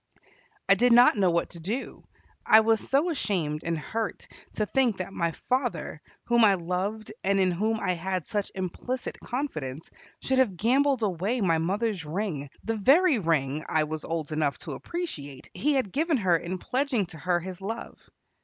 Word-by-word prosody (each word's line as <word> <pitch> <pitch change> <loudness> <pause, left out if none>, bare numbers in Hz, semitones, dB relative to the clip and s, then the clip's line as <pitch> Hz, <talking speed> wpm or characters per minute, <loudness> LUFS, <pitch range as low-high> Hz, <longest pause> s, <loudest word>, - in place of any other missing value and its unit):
I - - +7
did 245 0 +3
not 245 +1 +7
know 195 -3 +3
what 170 0 0
to 170 - -8
do. 215 +11 -4 0.4
I 220 - +7
was 225 0 +3
so 295 +6 +3
ashamed 165 - -1
and 165 0 -1
hurt 220 +8 -4 0.3
to 215 - 0
think 245 -2 +1
that 185 +1 -5
my 170 -1 0 0.2
father, 250 - -1 0.2
whom 235 -1 +3
I 200 -3 +6
loved 190 +5 -3
and 195 0 +2
in 185 -1 +3
whom 215 +5 0
I 185 - 0
had 180 0 -2
such 205 -2 -2
implicit 195 +7 -4
confidence, 160 - -5 0.3
should 265 0 0
have 210 -9 +2
gambled 260 +4 +2
away 200 +5 0
my 170 -6 +2
mother's 195 +2 -1
ring, 155 -3 -3
the 225 0 -2
very 280 - +5
ring 155 -4 0
I 155 - +3
was 155 0 -4
old 160 -3 -3
enough 150 -2 0
to - - -6
appreciate 145 - -6
he 300 +1 +1
had 255 -8 0
given 315 - +1
her 185 -6 +3
in 175 +3 -3
pledging 255 0 0
to 160 - -10
her 175 +2 +1
his 185 +1 -8
love. 225 +4 -6
195 Hz, 180 wpm, -27 LUFS, 170-240 Hz, 0.4 s, I